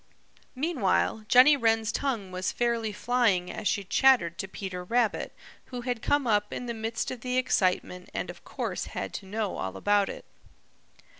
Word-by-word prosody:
Meanwhile 255 Hz, -, 0 dB
Jenny 260 Hz, +6 st, +7 dB
Wren's 225 Hz, -3 st, +2 dB
tongue 235 Hz, -9 st, -2 dB
was 185 Hz, +1 st, -2 dB
fairly 235 Hz, -2 st, 0 dB
flying 210 Hz, -5 st, +1 dB
as 210 Hz, -, -3 dB
she 200 Hz, +2 st, 0 dB
chattered 195 Hz, -5 st, +3 dB
to 195 Hz, -, -3 dB
Peter 185 Hz, -2 st, -6 dB
Rabbit, 230 Hz, +3 st, 0 dB, 0.3 s
who 250 Hz, -1 st, -6 dB
had 245 Hz, -2 st, -3 dB
come 290 Hz, -2 st, +1 dB
up 210 Hz, -2 st, +1 dB
in 245 Hz, -, -4 dB
the 235 Hz, -, -3 dB
midst 225 Hz, 0 st, -3 dB
of 250 Hz, -3 st, -7 dB
the 250 Hz, +1 st, -1 dB
excitement 185 Hz, -7 st, 0 dB
and -, -, -3 dB
of -, -, -16 dB
course -, -, -4 dB
had -, -, -3 dB
to 195 Hz, -, -7 dB
know 210 Hz, 0 st, -2 dB
all 95 Hz, 0 st, -4 dB
about 205 Hz, -1 st, +2 dB
it. -, -, -8 dB
225 Hz, 170 wpm, -28 LUFS, 195-245 Hz, 0.3 s, Jenny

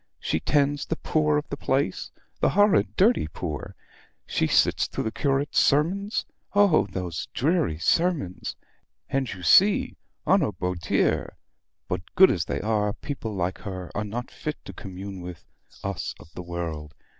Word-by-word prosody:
She 80 Hz, -, -1 dB
tends 145 Hz, -, +1 dB
the 160 Hz, -, -1 dB
poor 155 Hz, -2 st, +1 dB
of 150 Hz, -, -3 dB
the 140 Hz, -, -4 dB
place 135 Hz, -9 st, -1 dB, 0.3 s
the -, -, +3 dB
horrid 205 Hz, -1 st, +3 dB
dirty 205 Hz, -, +3 dB
poor! 75 Hz, -2 st, -6 dB, 0.5 s
She -, -, 0 dB
sits -, -, +3 dB
through -, -, -3 dB
the 110 Hz, -, -2 dB
curate's 140 Hz, +2 st, +1 dB
sermons 190 Hz, +9 st, +2 dB, 0.3 s
oh, 200 Hz, -, +5 dB
those 90 Hz, -5 st, -4 dB
dreary 150 Hz, -, +1 dB
sermons! 155 Hz, -, 0 dB, 0.6 s
And 135 Hz, -2 st, 0 dB
you 90 Hz, -2 st, -8 dB
see 195 Hz, -, +5 dB, 0.3 s
on 195 Hz, +1 st, +4 dB
a 135 Hz, -9 st, 0 dB
beau 90 Hz, 0 st, -2 dB
dire; 85 Hz, 0 st, 0 dB, 0.5 s
but 90 Hz, 0 st, -2 dB
good 190 Hz, 0 st, +8 dB
as 85 Hz, -3 st, -1 dB
they -, -, -2 dB
are, 105 Hz, -1 st, +1 dB
people 125 Hz, -7 st, -5 dB
like 90 Hz, 0 st, -2 dB
her 95 Hz, -4 st, -6 dB
are 100 Hz, -, -2 dB
not 115 Hz, +4 st, -5 dB
fit 150 Hz, -, -4 dB
to -, -, -8 dB
commune 95 Hz, -1 st, -8 dB
with 90 Hz, -2 st, -9 dB, 0.4 s
us 100 Hz, -5 st, -3 dB
of 80 Hz, -, -16 dB
the -, -, -6 dB
world. 85 Hz, -4 st, -5 dB
105 Hz, 160 wpm, -26 LUFS, 90-150 Hz, 0.6 s, good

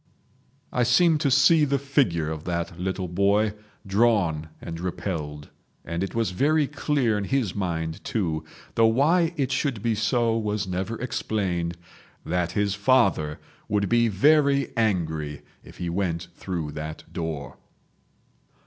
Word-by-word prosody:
I 125 Hz, -, +1 dB
seem 150 Hz, +7 st, +4 dB
to 140 Hz, -, +1 dB
see 140 Hz, +4 st, +5 dB
the 140 Hz, -1 st, +2 dB
figure 125 Hz, -, +1 dB
of 80 Hz, -1 st, -5 dB
that 85 Hz, -1 st, -3 dB
little 95 Hz, 0 st, -2 dB
boy, 100 Hz, +4 st, +2 dB, 0.3 s
drawn 95 Hz, -7 st, +2 dB
and 85 Hz, 0 st, -7 dB
repelled. 85 Hz, -5 st, -4 dB, 0.4 s
And 85 Hz, +2 st, -2 dB
it 95 Hz, -, -5 dB
was 115 Hz, -5 st, +1 dB
very 150 Hz, +10 st, +2 dB
clear 135 Hz, -6 st, 0 dB
in 100 Hz, -, -3 dB
his 125 Hz, -6 st, 0 dB
mind, 80 Hz, -4 st, -3 dB
too, 80 Hz, -8 st, -1 dB, 0.3 s
though 115 Hz, 0 st, +5 dB
why 160 Hz, +9 st, +3 dB
it 135 Hz, -2 st, 0 dB
should 130 Hz, -5 st, -1 dB
be 115 Hz, -1 st, +2 dB
so 115 Hz, +2 st, +1 dB
was 105 Hz, -2 st, -1 dB
never 95 Hz, +5 st, -3 dB
explained, 90 Hz, -8 st, -2 dB, 0.5 s
that 90 Hz, 0 st, -1 dB
his 100 Hz, -1 st, +1 dB
father 100 Hz, -, +2 dB, 0.3 s
would 100 Hz, -1 st, +1 dB
be 120 Hz, 0 st, +4 dB
very 140 Hz, +6 st, +3 dB
angry 80 Hz, -, -1 dB, 0.2 s
if -, -, -14 dB
he 90 Hz, -, -4 dB
went 85 Hz, -1 st, -2 dB
through 85 Hz, -6 st, -4 dB
that 75 Hz, +1 st, -6 dB
door. 80 Hz, -4 st, -4 dB
100 Hz, 140 wpm, -25 LUFS, 85-120 Hz, 0.5 s, see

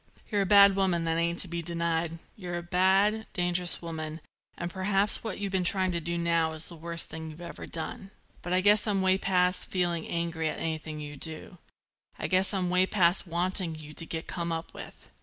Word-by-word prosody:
"You're 205 Hz, -1 st, +2 dB
a 195 Hz, -, 0 dB
bad 200 Hz, -1 st, +8 dB
woman; 185 Hz, -4 st, +1 dB
that 165 Hz, 0 st, 0 dB
ain't 170 Hz, +1 st, 0 dB
to -, -, -10 dB
be 170 Hz, 0 st, -3 dB
denied. 170 Hz, 0 st, -1 dB, 0.2 s
You're 175 Hz, -3 st, -5 dB
a 175 Hz, -, -5 dB
bad, 190 Hz, +4 st, +3 dB
dangerous 175 Hz, -1 st, -1 dB
woman, 160 Hz, -1 st, -5 dB, 0.4 s
and 175 Hz, 0 st, -4 dB
perhaps 195 Hz, +2 st, +2 dB
what 220 Hz, -5 st, -4 dB
you've 200 Hz, -1 st, -3 dB
been 190 Hz, -1 st, +1 dB
trying 185 Hz, +1 st, +2 dB
to 170 Hz, -1 st, -2 dB
do 170 Hz, +2 st, -2 dB
now 170 Hz, -1 st, +1 dB
is 160 Hz, 0 st, +5 dB
the 170 Hz, -, -9 dB
worst 170 Hz, +1 st, -5 dB
thing 160 Hz, 0 st, -6 dB
you've 155 Hz, +1 st, -11 dB
ever 170 Hz, -1 st, -8 dB
done. 170 Hz, +4 st, -5 dB, 0.3 s
But 175 Hz, -, -6 dB
I 185 Hz, +1 st, +3 dB
guess 205 Hz, +3 st, +4 dB
I'm 195 Hz, -2 st, +1 dB
way 190 Hz, 0 st, +3 dB
past 180 Hz, -1 st, +1 dB
feeling 175 Hz, -3 st, -1 dB
angry 170 Hz, -1 st, -2 dB
at -, -, -4 dB
anything 155 Hz, -1 st, -4 dB
you 145 Hz, -1 st, -7 dB
do. 160 Hz, +3 st, -5 dB, 0.6 s
I -, -, -4 dB
guess 185 Hz, +1 st, +2 dB
I'm 185 Hz, -3 st, -1 dB
way 185 Hz, +1 st, +3 dB
past 180 Hz, -1 st, +3 dB
wanting 175 Hz, 0 st, 0 dB
you 155 Hz, -1 st, -10 dB
to 165 Hz, -, -4 dB
get 160 Hz, 0 st, -4 dB
come 170 Hz, -1 st, -3 dB
up 165 Hz, 0 st, -4 dB
with. -, -, -10 dB
175 Hz, 215 wpm, -29 LUFS, 165-190 Hz, 0.6 s, bad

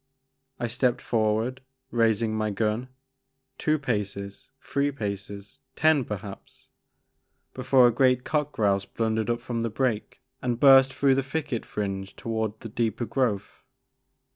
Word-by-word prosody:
I -, -, -1 dB
stepped 120 Hz, +1 st, 0 dB
forward, 115 Hz, +3 st, 0 dB, 0.3 s
raising 115 Hz, -1 st, +2 dB
my 110 Hz, 0 st, 0 dB
gun, 110 Hz, +4 st, -1 dB, 0.7 s
two 155 Hz, 0 st, +2 dB
paces, 100 Hz, -7 st, -4 dB
three 140 Hz, +1 st, 0 dB
paces, 100 Hz, -1 st, -6 dB, 0.2 s
ten 155 Hz, -5 st, +3 dB
perhaps, 100 Hz, -1 st, -8 dB, 0.8 s
before 130 Hz, 0 st, +4 dB
a 120 Hz, -, +5 dB
great 125 Hz, 0 st, +3 dB
cock 150 Hz, -1 st, -1 dB
grouse 100 Hz, -5 st, +1 dB
blundered 110 Hz, -1 st, -1 dB
up 120 Hz, 0 st, 0 dB
from 115 Hz, -2 st, -3 dB
the 115 Hz, -, -1 dB
brake 115 Hz, -1 st, -2 dB, 0.2 s
and 120 Hz, -2 st, -1 dB
burst 135 Hz, -1 st, +7 dB
through 135 Hz, 0 st, +3 dB
the 135 Hz, -, +2 dB
thicket 135 Hz, -3 st, -3 dB
fringe 95 Hz, -2 st, -4 dB
toward 110 Hz, -1 st, -3 dB
the 115 Hz, -, -7 dB
deeper 115 Hz, +1 st, -1 dB
growth. 115 Hz, -6 st, -2 dB
115 Hz, 135 wpm, -26 LUFS, 105-130 Hz, 0.8 s, burst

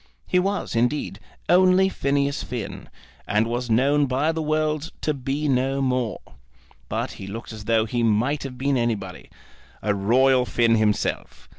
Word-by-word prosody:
He 180 Hz, -, +2 dB
was, 195 Hz, -7 st, -2 dB
indeed, 120 Hz, -3 st, 0 dB, 0.3 s
only 185 Hz, +1 st, +5 dB
Phineas 140 Hz, -5 st, 0 dB
Finn, 120 Hz, -4 st, -6 dB, 0.4 s
and 105 Hz, +2 st, +2 dB
was 120 Hz, +1 st, -3 dB
known 140 Hz, +5 st, +3 dB
by 135 Hz, +5 st, +1 dB
the 160 Hz, 0 st, -3 dB
world 155 Hz, 0 st, -1 dB
to 155 Hz, -, 0 dB
be 140 Hz, +2 st, -2 dB
no 135 Hz, 0 st, +1 dB
more; 125 Hz, -4 st, -1 dB, 0.7 s
but -, -, -2 dB
he 95 Hz, -, -9 dB
looked 115 Hz, +3 st, -7 dB
as 110 Hz, -1 st, -9 dB
though 110 Hz, 0 st, +2 dB
he 120 Hz, +2 st, -2 dB
might 115 Hz, +6 st, +1 dB
have 130 Hz, -2 st, -7 dB
been 135 Hz, +1 st, +1 dB
anybody, 110 Hz, -6 st, -3 dB, 0.5 s
a 105 Hz, -, +1 dB
royal 125 Hz, +6 st, +3 dB
Finn 115 Hz, -1 st, +2 dB
himself. 110 Hz, -2 st, -1 dB
130 Hz, 155 wpm, -23 LUFS, 115-145 Hz, 0.7 s, only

